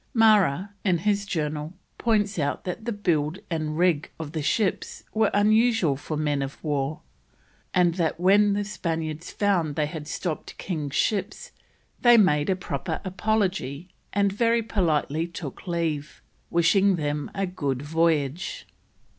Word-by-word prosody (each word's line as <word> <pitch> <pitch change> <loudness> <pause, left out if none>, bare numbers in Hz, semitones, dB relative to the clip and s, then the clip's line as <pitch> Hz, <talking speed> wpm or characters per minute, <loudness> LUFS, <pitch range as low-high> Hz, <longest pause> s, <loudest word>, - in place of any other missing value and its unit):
Marra, 205 -6 +4
in 185 -4 +2
his 200 +3 0
Journal, 155 -1 -3 0.2
points 210 -4 +1
out 145 -1 -1
that 190 +5 -5
the 235 - -1
build 170 -6 0
and 155 -2 -2
rig 170 -4 +2
of 155 -2 -5
the 160 -1 -3
ships 190 +7 -1
were 220 -1 +3
unusual 215 - +3
for 150 +3 -5
men 145 -2 0
o' 135 - -2
war, 145 -1 -1 0.7
and 175 -2 +3
that 165 -2 -1
when 200 +3 +5
the 205 +1 0
Spaniards 165 -5 -4
found 180 -8 +1
they 150 - +1
had 150 -1 -6
stopped 160 0 -4
king's 150 -6 -4
ships, 200 +5 -1 0.5
they 240 -1 +7
"made 150 -8 +3
a 190 - +3
proper 160 -3 -4
apology, 185 -6 -1 0.2
and 200 -1 +1
very 230 +2 +2
politely 165 -6 0
took 170 -2 -8
leave, 160 -4 -2 0.3
wishing 190 +4 +4
them 150 -2 -2
a 195 - 0
good 145 -8 -3
voyage." 160 +1 0
170 Hz, 145 wpm, -25 LUFS, 150-200 Hz, 0.7 s, they